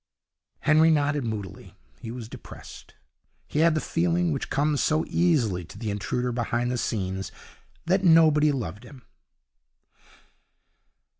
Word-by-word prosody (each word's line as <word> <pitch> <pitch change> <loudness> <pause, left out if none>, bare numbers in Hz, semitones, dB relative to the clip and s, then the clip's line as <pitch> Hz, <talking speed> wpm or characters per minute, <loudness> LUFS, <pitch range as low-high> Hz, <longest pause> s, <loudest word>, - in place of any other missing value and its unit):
Henry 155 +2 +5
nodded 145 -2 +1
moodily. 100 -5 -6 0.2
He 115 - -8
was 120 -1 -7
depressed. - - -12 0.5
He 150 - -3
had 165 0 +4
the - - +1
feeling, 170 +2 0
which 140 - -3
comes 145 +1 +1
so 155 0 +1
easily 125 - +1
to 80 - -13
the 110 -3 -3
intruder 125 +4 -2
behind 120 0 -1
the 125 - -2
scenes, 95 -3 -3 0.5
that 190 +3 +1
nobody 155 -3 +5
loved 110 - -5
him. 125 0 -14
135 Hz, 130 wpm, -26 LUFS, 115-155 Hz, 0.5 s, Henry